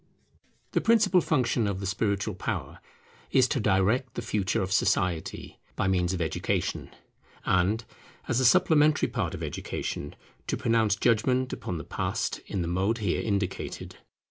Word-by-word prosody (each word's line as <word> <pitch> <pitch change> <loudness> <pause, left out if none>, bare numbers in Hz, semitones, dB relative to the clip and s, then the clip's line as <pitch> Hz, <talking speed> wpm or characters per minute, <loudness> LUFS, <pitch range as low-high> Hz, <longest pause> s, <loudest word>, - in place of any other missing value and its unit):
The - - +1
principal 215 -5 +4
function 125 -8 +1
of 100 -2 -2
the 100 - -4
spiritual 100 +2 -1
power 90 - -4 0.5
is 130 -2 +4
to - - 0
direct 105 +5 +1
the - - -4
future 95 -3 0
of 95 - -4
society 90 -3 0 0.2
by 95 - 0
means 90 -2 +1
of 95 - -2
education; 80 - -2 0.6
and, 100 +5 +2 0.4
as 120 - +1
a 130 - +2
supplementary 155 +1 +4
part - - -2
of - - -6
education, 75 - -4 0.3
to - - -1
pronounce 115 -3 +2
judgment 125 +4 +1
upon 90 - -4
the - - -6
past - - -2
in 95 - -2
the - - -3
mode 95 +6 0
here 100 -6 -1
indicated. 100 -3 -3
105 Hz, 150 wpm, -27 LUFS, 95-125 Hz, 0.6 s, principal